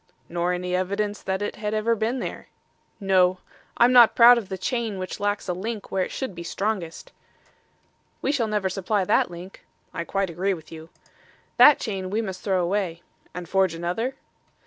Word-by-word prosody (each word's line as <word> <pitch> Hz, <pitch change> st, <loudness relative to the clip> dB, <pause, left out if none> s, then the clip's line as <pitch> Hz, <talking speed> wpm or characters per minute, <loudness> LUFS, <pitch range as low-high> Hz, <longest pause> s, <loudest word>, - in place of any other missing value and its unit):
"Nor 175 Hz, +1 st, -1 dB
any 180 Hz, 0 st, -2 dB
evidence 200 Hz, +3 st, -2 dB
that 190 Hz, +1 st, -2 dB
it 205 Hz, -, -4 dB
had 210 Hz, 0 st, -3 dB
ever 220 Hz, +2 st, +1 dB
been 225 Hz, +4 st, -1 dB
there." -, -, -6 dB, 0.5 s
"No. 185 Hz, -2 st, +3 dB, 0.4 s
I'm 240 Hz, +1 st, +5 dB
not 240 Hz, -2 st, +7 dB
proud 240 Hz, 0 st, +8 dB
of 205 Hz, -4 st, -10 dB
the 190 Hz, -, -4 dB
chain 225 Hz, +1 st, -2 dB
which 185 Hz, 0 st, -5 dB
lacks 205 Hz, 0 st, -1 dB
a 180 Hz, -, 0 dB
link 210 Hz, +4 st, -5 dB
where 190 Hz, -1 st, +1 dB
it -, -, -4 dB
should 260 Hz, -7 st, -4 dB
be 170 Hz, -, -8 dB
strongest." 185 Hz, -1 st, -4 dB, 1.1 s
"We -, -, 0 dB
shall 250 Hz, -6 st, 0 dB
never 210 Hz, -2 st, 0 dB
supply 195 Hz, +1 st, -1 dB
that -, -, +2 dB
link." 175 Hz, +2 st, -11 dB, 0.3 s
"I -, -, -3 dB
quite 195 Hz, +1 st, -2 dB
agree 190 Hz, +4 st, -1 dB
with 160 Hz, -2 st, -14 dB
you." 160 Hz, 0 st, -10 dB, 0.7 s
"That 295 Hz, -, +8 dB
chain 190 Hz, -3 st, -4 dB
we 210 Hz, +3 st, -1 dB
must 190 Hz, -5 st, -4 dB
throw 190 Hz, -3 st, 0 dB
away." 175 Hz, -2 st, -2 dB, 0.3 s
"And 180 Hz, -1 st, -6 dB
forge 190 Hz, -2 st, +1 dB
another?" 180 Hz, +10 st, -3 dB
195 Hz, 185 wpm, -24 LUFS, 180-215 Hz, 1.1 s, proud